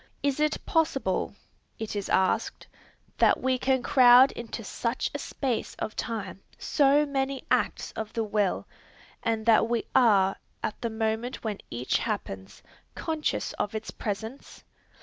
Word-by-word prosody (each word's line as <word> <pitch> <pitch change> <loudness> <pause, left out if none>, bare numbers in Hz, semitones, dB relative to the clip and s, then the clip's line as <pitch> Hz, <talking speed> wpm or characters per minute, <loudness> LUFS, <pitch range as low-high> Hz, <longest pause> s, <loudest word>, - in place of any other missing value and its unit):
Is 280 0 +1
it 305 0 +2
possible, 270 - 0 0.4
it 220 -1 -5
is 200 -1 -3
asked, 190 0 +1 0.5
that - - +5
we 260 0 +1
can 260 -1 +1
crowd 250 +1 +7
into 230 0 -6
such 235 +4 -2
a - - -3
space 255 -5 -3
of 215 - -5
time 220 -4 -4 0.2
so 285 +1 +3
many 275 -1 -2
acts - - +1
of 220 -1 -5
the 225 - 0
will, 205 -2 0 0.5
and 225 -1 -1
that 225 0 +5
we 235 -1 0
are, 200 -6 +4 0.3
at 210 - -3
the 235 - -1
moment 220 +2 -2
when 215 -3 -3
each 120 +2 -1
happens, 95 0 -5 0.3
conscious 315 -2 -2
of 205 - -2
its 220 - -4
presence? 220 +5 -6
230 Hz, 145 wpm, -27 LUFS, 215-265 Hz, 0.5 s, crowd